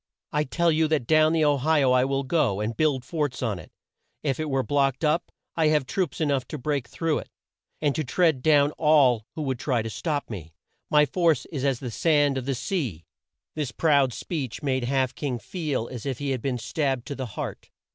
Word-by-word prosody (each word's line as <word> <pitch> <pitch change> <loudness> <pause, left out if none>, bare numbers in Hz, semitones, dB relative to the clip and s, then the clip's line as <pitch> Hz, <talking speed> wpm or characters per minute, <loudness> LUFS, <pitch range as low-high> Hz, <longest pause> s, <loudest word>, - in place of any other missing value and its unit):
I 150 0 +1
tell 170 +5 +1
you 160 0 +2
that 155 -5 0
down 155 +3 +4
the 160 -2 +2
O 145 -1 +3
hi 150 +2 +2
o 130 - +4
I 125 0 +4
will 135 0 0
go, 130 - +1
and 110 +2 -2
build 140 -2 +1
forts 145 -6 -2
on 105 -6 -1
it. - - -13 0.5
If 140 -2 -1
it 155 -1 -2
were 135 -1 +1
blocked 140 0 +1
up 155 +3 +1 0.2
I 160 -2 +3
have 150 -3 +2
troops 180 +7 -2
e 160 - +2
nough 135 -4 0
to 150 - -5
break 140 -1 -2
through 165 -2 -1
it - - -10 0.5
and 145 -2 +2
to 155 - -1
tread 160 -1 +2
down 145 0 +4
all 135 -8 +4
who 155 - -3
would 130 -3 -2
try 125 -6 0
to 115 - -5
stop 150 0 -2
me. 85 -7 -8 0.3
My 150 0 +5
force 165 -1 +1
is 140 -5 -3
as 135 -4 +1
the 125 -3 -4
sand 145 -1 +2
of 130 - -8
the 135 - 0
sea!" 120 - -3 0.5
This 150 -5 -3
proud 140 -3 +3
speech 135 -2 -5
made 130 -3 0
Half 130 0 +1
King 135 -5 -3
feel 145 - -3
as 125 0 -6
if 130 -3 -2
he 140 0 -2
had 130 -3 -2
been 130 -1 -1
stabbed 135 0 -1
to 145 - -5
the 130 -2 -4
heart. - - -5
140 Hz, 225 wpm, -25 LUFS, 125-155 Hz, 0.5 s, My